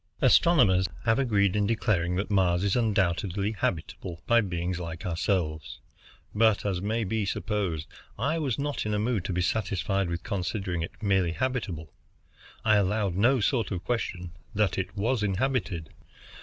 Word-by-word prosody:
Astronomers 125 Hz, -, +5 dB, 0.2 s
have 115 Hz, +2 st, +3 dB
agreed 100 Hz, -7 st, +2 dB
in 105 Hz, -1 st, +2 dB
declaring 100 Hz, -6 st, +1 dB
that 100 Hz, +3 st, -2 dB
Mars 90 Hz, -2 st, +3 dB
is 100 Hz, -1 st, +1 dB
undoubtedly 100 Hz, -3 st, +1 dB
habitable 85 Hz, -3 st, -3 dB
by 120 Hz, 0 st, +5 dB
beings 90 Hz, -2 st, -2 dB
like 85 Hz, -1 st, -6 dB
ourselves, 85 Hz, -2 st, -1 dB, 0.5 s
but, 110 Hz, -1 st, +3 dB
as 95 Hz, -3 st, -1 dB
may 110 Hz, +3 st, 0 dB
be 110 Hz, +2 st, -1 dB
supposed, 100 Hz, -6 st, -2 dB, 0.3 s
I 145 Hz, +9 st, 0 dB
was 135 Hz, -7 st, -1 dB
not 145 Hz, -5 st, -2 dB
in 105 Hz, -, 0 dB
a -, -, +1 dB
mood 110 Hz, -2 st, 0 dB
to -, -, -2 dB
be 90 Hz, 0 st, 0 dB
satisfied 95 Hz, -1 st, 0 dB
with 85 Hz, 0 st, -3 dB
considering 95 Hz, -3 st, -2 dB
it 85 Hz, -, -7 dB
merely 95 Hz, -4 st, +2 dB
habitable. 100 Hz, -, -3 dB, 0.7 s
I 110 Hz, -1 st, +5 dB
allowed 100 Hz, -1 st, +1 dB
no 120 Hz, +6 st, +3 dB
sort 115 Hz, +1 st, +1 dB
of 90 Hz, -4 st, -4 dB
question 90 Hz, -5 st, -3 dB, 0.2 s
that 105 Hz, -1 st, +2 dB
it 95 Hz, +1 st, -3 dB
was 115 Hz, +3 st, +1 dB
inhabited. 100 Hz, -, -1 dB
100 Hz, 155 wpm, -27 LUFS, 90-110 Hz, 0.7 s, Astronomers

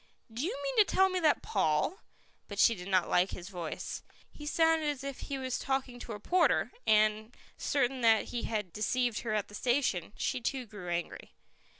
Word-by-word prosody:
"Do 235 Hz, +4 st, -3 dB
you 415 Hz, +9 st, -2 dB
mean -, -, -2 dB
to 430 Hz, -, +9 dB
tell 380 Hz, -1 st, +3 dB
me 370 Hz, -1 st, -1 dB
that 315 Hz, -4 st, +3 dB
Paul 175 Hz, -, +1 dB, 0.2 s
" -, -, -36 dB
But 205 Hz, -, -7 dB
she 230 Hz, -, +6 dB
did 180 Hz, -3 st, -8 dB
not 185 Hz, -3 st, +2 dB
like 180 Hz, +2 st, +3 dB
his 180 Hz, +1 st, -7 dB
voice. 175 Hz, -5 st, -5 dB, 0.3 s
He 295 Hz, -, -9 dB
sounded 325 Hz, -1 st, +3 dB
as 285 Hz, -2 st, -4 dB
if 275 Hz, -1 st, -5 dB
he 275 Hz, -, -4 dB
was 260 Hz, -1 st, -2 dB
talking 265 Hz, -2 st, -2 dB
to 235 Hz, -, -6 dB
a 210 Hz, -, -7 dB
porter, 355 Hz, -, +2 dB, 0.2 s
and, 215 Hz, +1 st, +3 dB, 0.2 s
certain 265 Hz, -2 st, 0 dB
that 225 Hz, -2 st, +4 dB
he 240 Hz, -, -3 dB
had 210 Hz, -6 st, -3 dB
deceived 240 Hz, +2 st, 0 dB
her 215 Hz, -2 st, -2 dB
at 210 Hz, -, -1 dB
the -, -, -16 dB
station, 240 Hz, -7 st, 0 dB
she 255 Hz, -, -1 dB
too 260 Hz, +1 st, -2 dB
grew 205 Hz, -5 st, -9 dB
angry. 170 Hz, 0 st, -4 dB
240 Hz, 205 wpm, -31 LUFS, 205-280 Hz, 0.3 s, to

